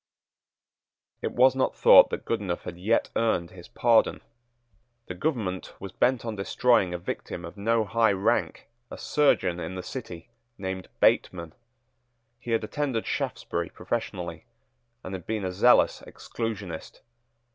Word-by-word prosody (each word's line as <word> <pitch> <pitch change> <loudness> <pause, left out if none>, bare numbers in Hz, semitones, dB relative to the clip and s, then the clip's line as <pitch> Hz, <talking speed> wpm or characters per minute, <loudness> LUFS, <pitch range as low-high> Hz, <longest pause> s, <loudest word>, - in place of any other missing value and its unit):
It - - -2
was 130 +1 +5
not 130 - 0
thought - - +8
that - - -5
Goodenough 100 -6 -2
had 85 0 -8
yet 110 +6 +1
earned 85 -7 0
his 90 -2 -12
pardon. 120 -2 +2 0.8
The - - -6
government 95 - -3
was 95 -1 -7
bent 125 +4 +1
on 115 -2 -3
destroying 100 -1 +2
a 90 - -2
victim 85 0 -6
of 85 - -10
no 110 +2 +1
high 110 0 +2
rank, 95 0 -1 0.2
a - - -8
surgeon 135 -12 +1
in 85 +2 -5
the 90 - -5
City, 110 -5 -8 0.3
named 95 -1 -5
Bateman. 85 -3 +2 0.9
He 120 - -10
had 115 -1 +1
attended 130 -1 -2
Shaftesbury 85 +1 -3
professionally, 90 -7 -5 0.6
and 95 - -7
had 90 -3 -7
been 110 -3 -2
a 90 - -2
zealous 110 +7 +4
Exclusionist. 100 -8 -6
100 Hz, 140 wpm, -26 LUFS, 90-115 Hz, 0.9 s, thought